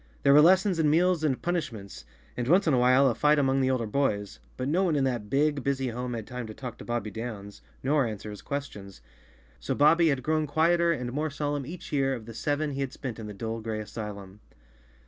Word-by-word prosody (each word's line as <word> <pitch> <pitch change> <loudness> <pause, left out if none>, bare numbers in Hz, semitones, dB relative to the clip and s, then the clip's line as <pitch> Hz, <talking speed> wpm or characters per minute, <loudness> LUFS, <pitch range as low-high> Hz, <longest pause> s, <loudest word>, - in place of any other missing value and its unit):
There 140 - +6
were 150 - +8
lessons 185 +2 +4
and 155 -2 +3
meals 170 +1 +2
and 140 -5 +1
punishments, 145 - -4 0.3
and 120 -1 -3
once 180 +7 +4
in 155 - +2
a 125 - +3
while 130 +2 +5
a 125 - +2
fight 150 +6 +3
among 135 -1 +2
the 130 - +2
older 130 -3 0
boys, 105 -4 -1 0.2
but 130 - -3
no 175 +7 +2
one 170 -5 +1
in 140 - +1
that 120 -6 -2
big, 145 0 +1
busy 135 -2 -1
home 125 +1 -4
had 110 -2 -5
time 125 -1 -6
to 110 - -9
talk 125 -3 -8
to - - -8
Bobbie 120 -3 -3
Downs, 105 -2 -7 0.2
nor 140 -1 +2
answer 105 -1 -6
his 105 - -9
questions. 105 - -6 0.6
So - - -3
Bobbie 165 +3 +5
had 135 -4 0
grown 155 +1 0
quieter 170 +3 +3
and 125 -6 -3
more 155 +3 -1
solemn 145 -1 -3
each 170 0 -9
year 135 -2 +1
of 115 -3 -9
the 115 - -9
seven 145 +4 -1
he 140 0 -4
had 135 -1 -3
spent 125 -5 -6
in 110 - -7
the 105 - -7
dull 115 +2 -4
gray 110 -1 -3
asylum. 105 -2 -7
135 Hz, 230 wpm, -27 LUFS, 115-150 Hz, 0.6 s, were